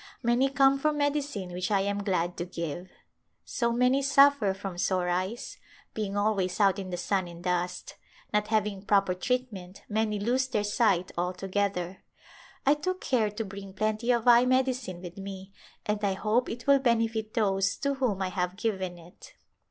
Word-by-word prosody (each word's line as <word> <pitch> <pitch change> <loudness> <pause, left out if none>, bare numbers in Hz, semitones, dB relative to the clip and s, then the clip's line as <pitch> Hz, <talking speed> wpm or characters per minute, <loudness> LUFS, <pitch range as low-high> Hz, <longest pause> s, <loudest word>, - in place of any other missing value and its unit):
Many 240 +3 +3
come 275 0 +4
for 305 +2 +2
medicine 285 -10 -2
which 180 +1 -2
I 200 -2 +2
am 200 +1 -1
glad 180 -3 0
to 175 - -3
give. 175 0 -5 0.6
So 235 -2 -1
many 250 +3 +3
suffer 275 -7 +4
from 190 -2 -6
sore 180 -1 +1
eyes, 185 +7 -3 0.4
being 205 -2 -3
always 200 -3 0
out 200 -1 +4
in 190 -1 -6
the 175 - -3
sun 190 +1 -1
and 170 0 -11
dust; 180 0 -2 0.4
not 210 0 +2
having 210 -3 0
proper 195 -2 +2
treatment 200 -3 -3
many 215 -1 0
lose 250 +5 +1
their 210 -5 -1
sight 205 -4 +1
altogether. 185 0 -2 0.6
I 280 - +6
took 370 +5 -3
care 230 -5 +1
to 210 +2 -5
bring 195 -1 -9
plenty 215 +3 -1
of 240 -1 +2
eye 240 0 +7
medicine 255 -8 0
with 175 +1 -8
me 195 0 -8 0.3
and 210 0 -2
I 200 -1 +2
hope 215 +5 0
it 235 +1 -6
will 280 -1 +5
benefit 225 -3 0
those 200 -2 +1
to 280 0 0
whom 240 -8 -1
I 185 - -1
have 180 -1 -2
given 190 -5 -2
it. 175 - -15
205 Hz, 175 wpm, -28 LUFS, 185-240 Hz, 0.6 s, eye